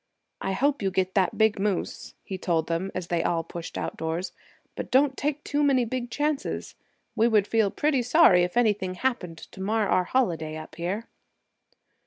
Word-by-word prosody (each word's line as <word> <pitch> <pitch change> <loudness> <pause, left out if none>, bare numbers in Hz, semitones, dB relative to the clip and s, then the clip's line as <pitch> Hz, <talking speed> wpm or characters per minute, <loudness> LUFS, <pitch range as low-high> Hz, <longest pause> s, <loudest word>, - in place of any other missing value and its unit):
"I 195 - -1
hope 280 +6 +1
you 195 - +1
get 185 0 0
that 190 -3 +1
big 220 -2 +3
moose," 200 -2 -2
he 190 - -5
told 165 -4 0
them, 170 +3 -2
as 185 - -3
they 170 -1 0
all 165 -1 0
pushed 170 +1 -7
outdoors, 160 +3 -3 0.4
"but - - -5
don't 270 +1 +3
take 295 +1 -2
too 290 +1 0 0.2
big 245 +1 -3
chances. 295 +3 -2 0.4
We 225 - +4
would 215 -4 +3
feel 220 -1 +2
pretty 290 +3 +1
sorry 245 - +6
if 180 +6 -2
anything 205 -6 +2
happened 180 -8 -2
to 190 - -11
mar 215 +2 +1
our 185 - +2
holiday 165 -11 0
up 155 0 -9
here." 180 +8 -3
195 Hz, 175 wpm, -26 LUFS, 175-245 Hz, 0.4 s, sorry